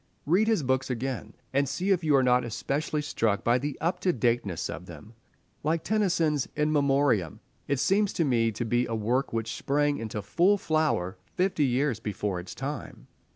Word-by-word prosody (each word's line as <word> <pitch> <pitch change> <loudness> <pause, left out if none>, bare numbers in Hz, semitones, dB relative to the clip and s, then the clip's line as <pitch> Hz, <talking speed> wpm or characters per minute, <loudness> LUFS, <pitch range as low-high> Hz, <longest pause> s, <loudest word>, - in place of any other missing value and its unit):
Read 185 +8 +3
his 220 -9 +2
books 130 +1 0
again, 130 +1 -4 0.2
and 140 0 +2
see 185 +8 -1
if 180 -3 +2
you 150 -2 +3
are 135 - +4
not 125 0 +4
especially 145 +6 -2
struck 110 -8 0
by 120 +2 +3
the 145 +1 -4
up 175 +3 -1
to 180 - +2
dateness 115 - 0
of 90 - -7
them. 85 +6 -11 0.5
Like 160 +2 0
Tennyson's 175 -9 +1
"In 150 0 +1
Memoriam," 135 - +2 0.3
it 140 -2 0
seems 200 +6 +2
to 165 - +1
me 115 -4 +2
to 115 +3 -3
be 120 +2 +1
work 115 +4 0
which 115 0 -2
sprang 145 +1 0
into 110 -2 -4
full 180 - +3
flower 155 - 0 0.2
fifty 180 -5 +2
years 130 -1 0
before 105 -3 -3
its 90 - -9
time. 135 0 -6
135 Hz, 180 wpm, -27 LUFS, 115-155 Hz, 0.5 s, are